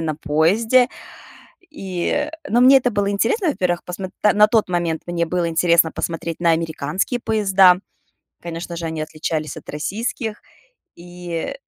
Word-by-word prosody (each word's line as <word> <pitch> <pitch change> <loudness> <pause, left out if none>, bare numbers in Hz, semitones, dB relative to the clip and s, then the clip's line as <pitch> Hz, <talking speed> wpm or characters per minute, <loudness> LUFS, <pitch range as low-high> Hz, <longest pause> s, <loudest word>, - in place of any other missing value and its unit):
на 160 -1 -2
поезде. 195 - +2 0.8
И, 195 - -3 0.2
ну, 240 +3 +3
мне 265 +2 +8
это 245 - 0
было 205 -1 0
интересно. 230 - 0
Во-первых, 180 -9 -1
посм 180 +2 -5 0.2
на 210 0 +5
тот 220 -2 +2
момент 170 -2 -1
мне 170 -1 -1
было 175 +1 -1
интересно 170 0 +3
посмотреть 165 0 -4
на 170 -1 +4
американские 165 - -2
поезда. 195 -5 +4 0.6
Конечно 170 0 -6
же, 165 -1 -4
они 160 -1 -4
отличались 155 0 -4
от - - -12
российских. 215 - -4 0.5
И 175 +4 -6
175 Hz, 140 wpm, -20 LUFS, 165-210 Hz, 0.8 s, мне